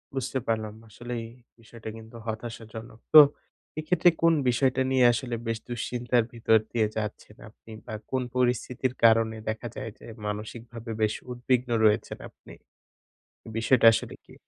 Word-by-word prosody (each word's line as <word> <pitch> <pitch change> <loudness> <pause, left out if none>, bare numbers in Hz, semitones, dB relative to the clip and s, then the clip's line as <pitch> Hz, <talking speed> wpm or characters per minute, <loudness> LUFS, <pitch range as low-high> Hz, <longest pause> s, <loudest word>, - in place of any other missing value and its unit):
বুঝতে 130 0 -2
পারলাম। 110 -2 -1 0.2
আসলেই 120 +2 -6 0.3
বিষয়টা 115 0 -10
কিন্তু 110 +1 -13
হতাশাজনক। 110 0 -7
তো 155 - +13 0.6
এক্ষেত্রে 175 +2 +3
কোন 165 0 +5 0.2
বিষয়টা 130 +1 +2
নিয়ে 130 -2 +4
আসলে 120 0 -3
বেশ 115 -1 -1
দুশ্চিন্তার 120 0 0
ভিতর 115 -1 +4
দিয়ে 110 -3 +2
যাচ্ছেন 105 0 -5
আপনি 110 +1 -17
বা 110 - -7 0.2
কোন 130 -1 0
পরিস্থিতির 125 0 0
কারণে 110 0 +4
দেখা 110 +2 -4
যায় 115 - -5
যে - - -14 0.2
মানসিকভাবে 115 +2 -6
বেশ 110 0 +2 0.2
উদ্বিগ্ন 125 0 0 0.2
রয়েছেন 105 +1 +2
আপনি? - - -16 1.0
বিষয়টা 115 +1 +4
আসলে - - -4
কী? - - -16
115 Hz, 135 wpm, -27 LUFS, 110-125 Hz, 1.0 s, তো